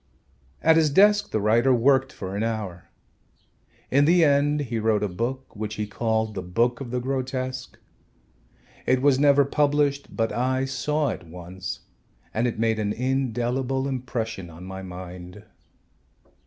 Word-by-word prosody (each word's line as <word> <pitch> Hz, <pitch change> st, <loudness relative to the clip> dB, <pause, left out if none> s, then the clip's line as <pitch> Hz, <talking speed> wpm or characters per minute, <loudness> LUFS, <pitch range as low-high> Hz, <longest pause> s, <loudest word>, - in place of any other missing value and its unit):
At 160 Hz, 0 st, +6 dB
his 160 Hz, -2 st, +4 dB
desk 205 Hz, +7 st, +4 dB
the 110 Hz, -, 0 dB
writer 115 Hz, +5 st, +3 dB
worked 135 Hz, +2 st, +3 dB
for 95 Hz, 0 st, -6 dB
an 100 Hz, -, -2 dB
hour. 105 Hz, -6 st, -4 dB, 1.0 s
In 140 Hz, +2 st, +4 dB
the 170 Hz, +1 st, +5 dB
end 145 Hz, +1 st, +3 dB
he 120 Hz, -5 st, -3 dB
wrote 110 Hz, -1 st, +1 dB
a -, -, +1 dB
book 120 Hz, +9 st, -4 dB
which 105 Hz, 0 st, -4 dB
he 105 Hz, -, -2 dB
called 110 Hz, +1 st, -1 dB
"The 95 Hz, -, -4 dB
Book 115 Hz, +9 st, 0 dB
of 130 Hz, -, -5 dB
the 125 Hz, +1 st, -1 dB
Grotesque." 130 Hz, 0 st, -3 dB, 1.1 s
It 130 Hz, 0 st, +2 dB
was 140 Hz, -2 st, +4 dB
never 140 Hz, -1 st, +5 dB
published, 145 Hz, 0 st, +1 dB
but 115 Hz, -1 st, +1 dB
I 130 Hz, +2 st, 0 dB
saw 145 Hz, +3 st, -1 dB
it 85 Hz, -, -6 dB
once 90 Hz, +2 st, -7 dB, 0.5 s
and 115 Hz, +3 st, +1 dB
it 120 Hz, -, -3 dB
made 110 Hz, 0 st, +1 dB
an 105 Hz, -1 st, -1 dB
indelible 130 Hz, +1 st, -1 dB
impression 120 Hz, -8 st, -4 dB
on 85 Hz, +2 st, -12 dB
my 95 Hz, +1 st, -7 dB
mind. 90 Hz, +1 st, -9 dB
120 Hz, 155 wpm, -25 LUFS, 105-135 Hz, 1.1 s, At